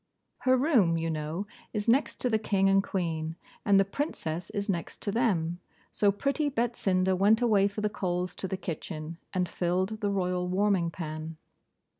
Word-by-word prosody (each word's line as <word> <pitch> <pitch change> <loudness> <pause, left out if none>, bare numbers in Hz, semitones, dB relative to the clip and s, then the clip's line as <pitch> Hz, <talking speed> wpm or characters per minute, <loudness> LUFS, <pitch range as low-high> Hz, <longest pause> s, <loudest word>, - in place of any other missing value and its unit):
Her 260 0 +3
room, 240 - +3
you 165 0 -1
know, 155 +5 -3 0.3
is 210 -1 -2
next 260 +6 +2
to 250 - +2
the 220 - +3
King 195 -2 +2
and 195 0 +4
Queen, 160 -4 -2 0.3
and 200 -2 +5
the 195 - +4
Princess 180 - -3
is 205 -1 -3
next 175 -5 -3
to 200 - 0
them. 180 -7 +1 0.3
So 205 -1 +3
pretty 280 +8 0
Betsinda 195 -7 +1
went 205 +4 +4
away 210 -5 +4
for 205 +1 -5
the 210 - +2
coals 180 -3 -2
to 190 - -2
the 190 - -3
kitchen, 165 -2 -6
and 180 -1 0
filled 185 +6 -1
the 205 - +1
royal 180 -2 0
warming 190 -2 +2
pan. 160 -1 -6
190 Hz, 175 wpm, -29 LUFS, 170-210 Hz, 0.3 s, and